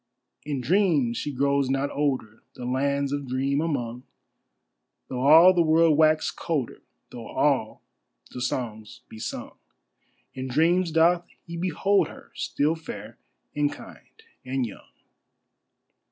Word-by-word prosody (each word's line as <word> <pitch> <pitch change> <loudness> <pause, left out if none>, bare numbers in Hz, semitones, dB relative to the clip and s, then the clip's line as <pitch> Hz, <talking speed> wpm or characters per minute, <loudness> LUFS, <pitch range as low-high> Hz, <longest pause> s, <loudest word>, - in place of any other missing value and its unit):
In 140 -3 -2
dreams 145 - +2
she 145 - -3
grows 140 0 +1
not 135 +1 0
older 130 -7 -2
The 125 - -7
lands 140 +2 0
of 145 -1 -3
Dream 135 +3 0
among, 125 -7 -3 1.1
Though 125 - -4
all 160 +7 +8
the 175 - +3
world 160 -1 +4
wax 155 0 +3
colder, 150 -8 -3 0.3
Though - - -8
all - - 0 0.5
the 125 - -7
songs 110 -4 -4
be 110 - -11
sung, 115 - -6 0.7
In 130 0 -5
dreams 165 +7 +2
doth 170 +2 +3 0.2
he 170 - -7
behold 185 +1 +1
her - - -14
Still 150 +3 0
fair 115 -8 -9 0.4
and 145 0 +1
kind 445 - -14 0.2
and 130 0 -1
young. 110 - -11
140 Hz, 130 wpm, -25 LUFS, 130-160 Hz, 1.1 s, all